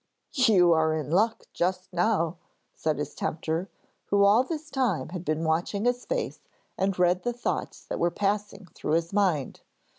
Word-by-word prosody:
'You 210 - +5
are 160 -1 +3
in 155 -1 -4
luck 220 +6 +2
just 185 +1 -1
now,' 175 -2 +1 0.4
said 155 -1 -1
his 150 0 -4
tempter, 165 +3 -2 0.4
who 200 0 +3
all 210 +5 +6
this 310 +2 -6
time 225 - 0
had 175 0 -6
been 155 -1 -1
watching 170 +6 0
his 245 0 0
face - - -2 0.4
and 190 0 0
read 180 0 +3
the 245 - -1
thoughts 240 - -3
that - - -4
were 170 - +3
passing 205 +1 -2
through 150 - -3
his 165 +2 0
mind. 185 -9 +1
185 Hz, 170 wpm, -27 LUFS, 165-215 Hz, 0.4 s, all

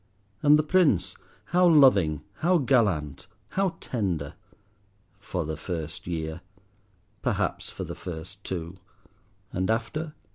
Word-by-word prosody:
And 150 0 +7
the 155 - +2
Prince! 155 - +3 0.3
how 180 0 +4
loving, 115 - +5
how 175 +3 +3
gallant, 105 - +1 0.2
how 195 -2 0
tender—for 100 - -6
the 80 +1 -3
first 80 0 -5
year, 80 0 -3 0.8
perhaps - - -1
for - - -6
the - - -5
first 90 +4 -7
two. 85 0 -5 0.8
And 95 +2 -1
after? 150 +8 -2
100 Hz, 110 wpm, -27 LUFS, 85-140 Hz, 0.8 s, And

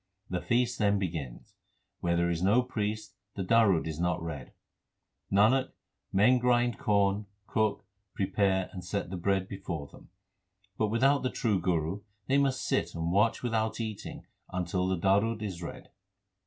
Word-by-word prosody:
The 90 -1 -1
feast 120 0 +1
then 100 -1 +3
begins. 80 -10 -5 0.5
Where 85 0 0
there 85 0 +2
is 85 0 -2
no 105 +7 +4
priest 110 -3 -3 0.2
the 95 - -2
darud 100 -4 +4
is 80 -1 -4
not 90 -1 +1
read: 80 -6 -6 0.8
Nanak, 115 +7 +3 0.4
men 115 +6 +5
grind 120 -1 +2
corn, 100 -4 +1 0.2
cook, 110 -2 0 0.3
prepare, 95 -1 +1
and 90 -2 -7
set 90 0 -3
the - - -3
bread 95 +1 0
before 95 -7 -5
them; - - -16 0.7
But 110 - +1
without 135 +6 +3
the 130 - 0
true 105 -8 0
Guru 85 +2 0 0.2
they 140 +1 +3
must 135 -2 +1
sit - - 0
and 85 0 -1
watch 105 +6 +2
without 110 -2 0
eating 110 -3 -5 0.3
until 90 +1 -1
the 95 0 0
darud 100 +5 +2
is 95 -5 -5
read. 85 - -8
100 Hz, 155 wpm, -30 LUFS, 90-115 Hz, 0.8 s, men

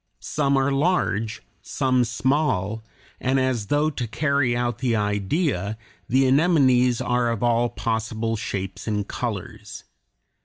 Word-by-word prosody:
Some 140 -2 0
are 135 +1 +2
large, 135 - 0 0.2
some 130 -1 +1
small, 115 -4 0 0.4
and 130 +1 +1
as 130 -5 0
though 150 +5 +1
to 125 -4 -4
carry 130 +1 +1
out 120 -1 -1
the 120 -3 +1
idea 105 - -1 0.3
the 130 +2 +3
anemones 130 -4 +3
are 125 -1 +1
of 115 -1 -2
all 120 0 +2
possible 115 0 -2
shapes 95 -3 -5
and 105 -2 -1
colors. - - -5
120 Hz, 125 wpm, -23 LUFS, 110-135 Hz, 0.4 s, the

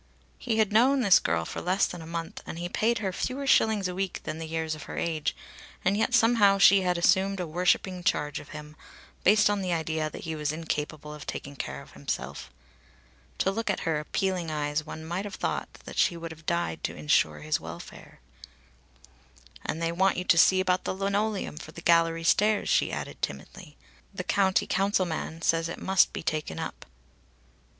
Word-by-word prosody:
He 225 -3 -1
had 215 -2 +2
known 260 +5 +5
this 200 -6 +6
girl 80 0 0
for - - -5
less 185 +3 +2
than 175 - -6
a 160 - -9
month 165 0 -5
and - - -6
he 175 +1 -3
paid 230 +6 +1
her 195 -3 -2
fewer 265 +7 -3
shillings 220 -7 +3
a 180 - -4
week 190 0 -3
than 155 - -5
the 165 - -5
years 160 0 -2
of 155 - -8
her - - -6
age, 160 -3 -1 0.5
and 195 +2 +3
yet 225 +4 +2
somehow 225 -4 +5
she 195 0 +7
had 180 -1 +1
assumed 190 +3 +3
a 180 - -1
worshipping 180 +2 0
charge 150 -3 0
of - - -13
him, 150 0 -9 0.5
based 210 +2 +5
on 205 -1 +1
the 185 -1 -2
idea 160 -2 -1
that - - -9
he 160 -1 -4
was 150 -1 -1
incapable 155 -1 -4
of 150 0 -10
taking 140 0 -6
care 125 - -5
of - - -17
himself. - - -5 0.9
To 195 - +1
look 225 +2 -3
at 195 - 0
her 160 -3 0
appealing 180 +2 -2
eyes 150 0 -1
one 160 +1 -8
might 175 +5 -3
have 205 - -6
thought - - -3
that - - -5
she 170 - +3
would 165 0 -6
have 160 0 -13
died 170 - -1
to - - -4
insure 75 0 +1
his 75 0 0
welfare. 85 +1 -10 1.4
"And 160 - -3
they 165 0 0
want 180 +1 +1
to 170 - +5
see 190 - +6
you - - +3
about 180 -1 +1
the - - -2
linoleum 200 -2 -1
for 155 - -9
the - - -9
gallery 165 0 +3
stairs," 210 +5 +3
she - - +2
added - - -6
timidly. - - -6 0.4
"The - - -3
County 190 -2 +2
Council 195 0 +1
man 165 0 -5
says 165 0 +2
it - - -5
must 190 -1 +3
be - - -6
taken 155 - -2
up." - - -6
175 Hz, 200 wpm, -27 LUFS, 155-195 Hz, 1.4 s, she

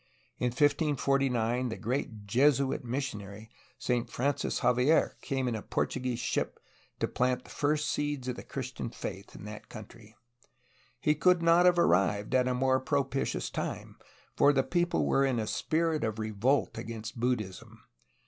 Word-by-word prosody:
In 125 - +1
1549 135 -3 +1
the 110 - -5
great 115 -3 -3
Jesuit 135 +5 +2
missionary 110 -4 -5 0.3
Saint 120 -2 -1
Francis 140 +3 -1
Xavier 125 +6 +3
came 135 -3 -1
in 120 - 0
a 110 - -3
Portuguese 125 +1 -2
ship 120 - -2 0.4
to - - +1
plant 125 0 0
the - - -14
first 150 +1 0
seeds 145 -3 -2
of 125 - -2
the - - -7
Christian 130 -3 -5
faith 100 -3 -7
in - - -10
that 105 0 -9
country. 110 +1 -12 0.8
He 150 - +3
could 175 +3 +3
not 170 +2 +6
have 175 -1 +4
ar 170 - +5
rived 100 +6 +2
at 130 -1 +3
a 125 - +1
more 130 +1 +2
propitious 135 0 -1
time, - - -4 0.4
for 145 - +5
the 135 -2 +2
people 175 +2 +1
were 135 - +3
in 135 -3 +1
a 110 - -1
spirit 160 +6 0
of 110 -1 -1
revolt 110 +6 0
against 115 +1 -6
Buddhism. 115 -6 -3
125 Hz, 160 wpm, -30 LUFS, 115-140 Hz, 0.8 s, not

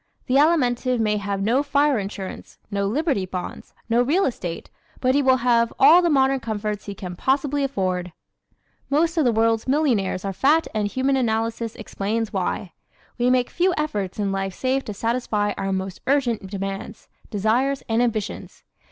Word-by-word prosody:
The 260 +1 +2
Alimentive 255 -5 +2
may 210 -1 +1
have 200 -1 -2
no 240 +6 +2
fire 285 -2 +2
insurance, 195 -1 -7
no 200 0 0
Liberty 265 - 0
bonds, 180 -1 -7
no 235 +1 +3
real 320 +10 +2
estate 175 -9 -4 0.3
but 255 0 +2
he 285 - +3
will 260 -1 +4
have 235 -1 +3
all 315 +6 +7
the 345 - +2
modern 270 -2 +3
comforts 210 -3 -4
he 200 - -5
can 180 -2 -7
possibly 275 +6 0
afford. 185 -8 -1 0.8
Most 320 +4 +2
of 315 -4 +2
the 240 - +4
world's 225 +1 +1
millionaires 245 -10 +1
are 195 - -2
fat 300 - +3
and 210 -1 0
Human 265 +5 0
Analysis 230 -1 -1
explains 220 +1 -3
why. 185 -1 -2 0.5
We 245 +1 +3
make 250 -1 +2
few 360 +1 +1
efforts 210 -12 -2
in 200 -2 -1
life 195 -1 -3
save 265 +1 0
to 210 - -5
satisfy 220 -2 -1
our 195 0 -2
most 190 -1 -3
urgent 250 -7 +1
demands, 195 0 -6 0.2
desires, 240 +7 0
and 225 +1 +1
ambitions. 225 -4 -3
230 Hz, 170 wpm, -23 LUFS, 200-270 Hz, 0.8 s, all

